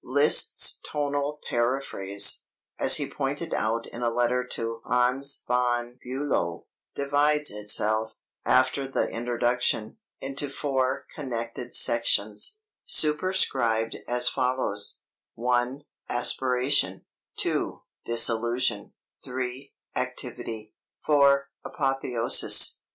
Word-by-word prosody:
Liszt's 145 +4 +3
tonal 145 0 -2
paraphrase, 120 -5 +1 0.4
as - - +6
he - - -2
pointed - - -4
out 115 +2 -1
in 120 - -9
a 120 - +1
letter 120 +2 +1
to 115 -2 -3
Hans 125 +3 +1
von 120 0 0
Bülow, 130 -10 -2 0.3
divides 145 +1 +1
itself, 105 +1 -1 0.3
after 130 +2 +2
the 135 - -1
introduction, 120 - -1 0.2
into 135 +1 -3
four 135 -1 -1
(connected) 120 -3 -5
sections, 115 - +2 0.3
superscribed 150 - +2
as 125 0 +3
follows: 125 -6 -1 0.3
(1) 125 +3 -1 0.3
Aspiration; 125 +2 +1 0.3
(2) - - -1 0.2
Disillusion; 115 -1 +1 0.3
(3) 130 +2 -5 0.2
Activity; 120 -4 -5 0.3
(4) 140 -2 +3
Apotheosis. 135 -4 +3
125 Hz, 90 wpm, -26 LUFS, 115-140 Hz, 0.4 s, as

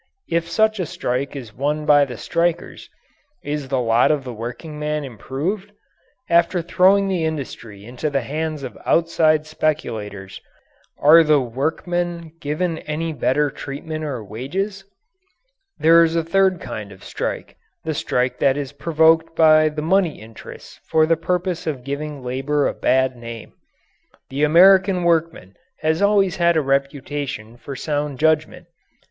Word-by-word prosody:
If 170 0 0
such 215 +4 +2
a 180 - -2
strike 135 +2 -3
is 120 -6 -8
won 150 +5 -2
by 145 -1 +5
the 125 -4 -8
strikers, 170 +5 -2 0.5
is 145 -1 -4
the 130 0 0
lot 115 0 +3
of 150 -3 +1
the 125 -1 -7
workingman 150 +6 -5
improved? 150 - -4 0.5
After 170 +1 +2
throwing 185 +3 +3
the 185 -4 -1
industry 125 -10 -5
into 125 +6 -4
the 140 -2 0
hands 155 0 -4
of 130 - -7
outside 155 -2 +2
speculators, 105 -11 -3 0.6
are 160 +3 +7
the 155 -2 +4
workmen 165 +6 -3
given 160 +3 -2
any 160 +2 -4
better 145 +1 +1
treatment 155 +4 -6
or 135 -7 -4
wages? 185 - -4 0.9
There 165 +1 +6
is 165 0 0
a 165 - +1
third 190 +1 +2
kind 110 -5 -7
of 95 -1 -14
strike - - -5 0.3
the 160 - -2
strike 125 -3 -1
that 135 0 +3
is 140 -2 -4
provoked 160 +2 +2
by 155 -1 +5
the 150 0 -5
money 175 -1 +1
interests 110 +1 -12
for 160 -1 +4
the 165 +1 +3
purpose 180 +1 -2
of 140 -5 -3
giving 140 0 -5
labour 135 +4 0
a - - -2
bad 130 0 +1
name. 115 -2 -9 0.8
The 140 +3 +1
American 185 +3 +5
workman 165 - 0 0.2
has 160 +2 0
always 200 -2 +3
had 170 -1 +3
a - - +3
reputation 135 -4 -3
for 130 +3 -8
sound 145 0 -3
judgment. 155 +1 +1
150 Hz, 145 wpm, -21 LUFS, 135-165 Hz, 0.9 s, are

